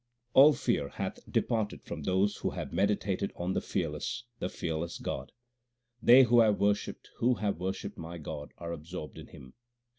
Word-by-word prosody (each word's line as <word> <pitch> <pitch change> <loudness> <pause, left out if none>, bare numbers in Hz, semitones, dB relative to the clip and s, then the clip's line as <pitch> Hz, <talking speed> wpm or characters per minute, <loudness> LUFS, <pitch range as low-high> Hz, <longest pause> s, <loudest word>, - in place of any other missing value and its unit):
All 145 +3 +9
fear 120 - 0
hath - - -4
departed 110 -4 0
from 85 - -6
those 95 +6 +1
who - - -1
have - - -6
meditated 100 +1 +1
on 90 +2 -2
the - - 0
fearless, - - -3 0.2
the 90 - -2
fearless 85 0 -3
God. - - -5 0.7
They 125 +3 +8
who 120 -1 +5
have 110 -3 +4
worshipped, 100 0 0
who 125 +1 +3
have 100 -4 -2
worshipped 95 +1 -4
my 85 +1 -6
God, 75 -2 -7
are 85 -1 -6
absorbed 85 0 -7
in - - -10
Him. 65 -1 -13
95 Hz, 170 wpm, -30 LUFS, 85-110 Hz, 0.7 s, All